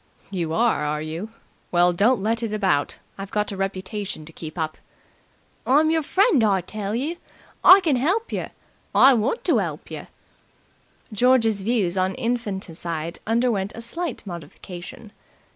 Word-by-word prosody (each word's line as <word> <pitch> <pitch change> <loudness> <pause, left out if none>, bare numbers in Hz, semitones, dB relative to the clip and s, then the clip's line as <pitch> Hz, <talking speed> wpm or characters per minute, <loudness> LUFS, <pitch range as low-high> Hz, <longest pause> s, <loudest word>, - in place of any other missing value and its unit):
"You 170 -5 -2
are, 230 -8 +2
are 150 0 -1
you? 165 +7 -5 0.4
Well, 175 0 +4
don't 205 +4 +3
let 225 +2 0
it 230 -2 -2
about. 190 -9 0 0.2
I've 195 0 -6
got 210 0 -1
a - - -4
reputation 195 -2 -4
to 165 - -11
keep 160 +1 -8
up." 155 -1 -3 0.9
"I'm 300 +4 +4
yer 325 0 +2
friend, 370 - +3
I 195 -3 +3
tell 205 +3 -4
you. 300 +8 -2 0.5
I 385 +2 +9
can 310 -8 +2
help 375 - 0
yer. - - -3 0.5
I 270 - +8
want 240 - 0
to - - +3
help - - -4
yer!" - - -7 1.1
George's 225 -2 +3
views 195 -4 0
on 185 +1 0
infanticide 190 -9 -3
underwent 225 -4 +1
a 230 - -7
slight 325 +2 -3
modification. 180 +3 -9
210 Hz, 150 wpm, -23 LUFS, 180-245 Hz, 1.1 s, I